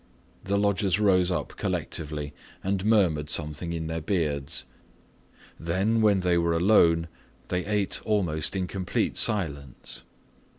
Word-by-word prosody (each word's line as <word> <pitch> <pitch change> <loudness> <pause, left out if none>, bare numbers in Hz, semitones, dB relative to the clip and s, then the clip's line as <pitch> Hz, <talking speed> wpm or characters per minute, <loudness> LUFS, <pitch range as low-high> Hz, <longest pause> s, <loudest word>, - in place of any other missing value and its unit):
The 100 +1 0
lodgers 100 -1 +1
rose 95 -4 +4
up 90 - -1
collectively 75 -2 -3 0.3
and 95 0 -1
murmured 90 -9 +2
something 75 +2 -2
in 80 -1 -3
their 80 0 -3
beards. 75 -6 -1 0.9
Then, 95 +7 +1
when 105 -3 +4
they 90 -1 +2
were 85 0 +1
alone, 85 -2 +4 0.4
they 90 0 -1
ate 105 -2 0
almost 90 -7 0
in 95 -1 0
complete 90 -1 -2
silence. 70 - -1
90 Hz, 125 wpm, -27 LUFS, 80-100 Hz, 0.9 s, rose